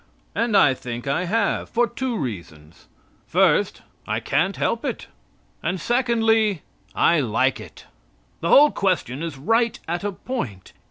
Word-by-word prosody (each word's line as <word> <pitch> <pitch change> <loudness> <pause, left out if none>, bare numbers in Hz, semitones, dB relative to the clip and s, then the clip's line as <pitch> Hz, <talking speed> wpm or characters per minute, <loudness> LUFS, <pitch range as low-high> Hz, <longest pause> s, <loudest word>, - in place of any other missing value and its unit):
And 230 -3 +1
I 140 -7 +5
think 120 -1 -7
I 160 +6 0
have, 205 +2 0
for 240 +1 +2
two 250 -1 -3
reasons. 85 - -7 0.4
First, - - +2 0.2
I - - -1
can't - - 0
help - - -1
it. - - -4 0.6
And 180 +3 -2
secondly, 225 - +1 0.3
I 170 - +4
like 130 +1 +1
it. - - -12 0.5
The 170 - -2
whole 295 +1 +7
question 175 -8 -1
is 165 -4 -5
right 225 - +1
at 175 +2 -3
a 205 - -1
point. 145 - -6
180 Hz, 145 wpm, -23 LUFS, -, 0.6 s, whole